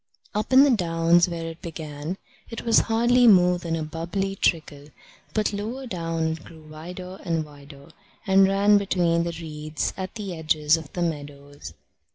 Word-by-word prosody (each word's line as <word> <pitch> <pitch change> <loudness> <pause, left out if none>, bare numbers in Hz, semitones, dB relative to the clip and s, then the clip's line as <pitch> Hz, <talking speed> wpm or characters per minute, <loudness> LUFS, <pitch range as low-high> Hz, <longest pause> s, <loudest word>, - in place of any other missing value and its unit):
Up 210 +3 -2
in 260 +1 +8
the 285 - +4
downs, 170 -4 +3
where 165 -1 -5
it 165 0 -8
began, 155 +1 -6 0.3
it 230 - -7
was 230 -1 +5
hardly 240 +2 +4
more 180 -4 +5
than 165 -1 -3
a 160 - -3
bubbly 175 +5 -3
trickle, 150 -6 -1 0.5
but 215 -1 0
lower 225 +6 -5
down 165 -6 -2
it 160 -1 -6
grew 160 -2 -14
wider 180 +5 -9
and 165 -3 -1
wider, 140 -1 -15 0.3
and 195 0 +5
ran 200 +1 +4
between 170 -4 +1
the 170 -1 -4
reeds 155 -2 -4
at 190 +2 -6
the 200 -4 -5
edges 155 -1 +2
of 160 -3 -8
the 175 - -1
meadows. 145 - -6
170 Hz, 170 wpm, -24 LUFS, 155-195 Hz, 0.5 s, in